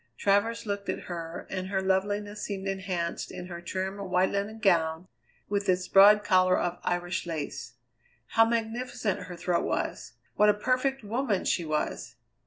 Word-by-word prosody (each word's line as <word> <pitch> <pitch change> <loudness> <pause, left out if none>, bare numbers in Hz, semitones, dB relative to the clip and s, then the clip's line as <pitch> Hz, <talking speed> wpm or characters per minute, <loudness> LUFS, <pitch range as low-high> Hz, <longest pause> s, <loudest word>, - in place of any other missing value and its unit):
Travers 205 - +1
looked 200 -1 -3
at - - -2
her, 165 -1 -6
and 185 -1 -3
her 190 0 0
loveliness 205 +2 -1
seemed 195 -1 -4
enhanced 185 -3 -3
in 180 - -7
her 170 -1 -7
trim 190 +3 -3
white 185 -1 +1
linen 200 +2 -2
gown 170 -4 +2 0.4
with 200 -1 -1
its 180 0 +1
broad 210 +2 +7
collar 185 -2 +4
of 175 0 -2
Irish 175 0 -2
lace. 150 -7 -5 0.6
How 225 - +5
magnificent 230 -2 -1
her 180 - -8
throat 170 0 0
was! - - -3 0.2
What 210 +1 +5
a 205 - +4
perfect 255 +4 0
woman 220 -2 -1
she 170 - +1
was! 155 -1 -2
195 Hz, 160 wpm, -28 LUFS, 180-210 Hz, 0.6 s, broad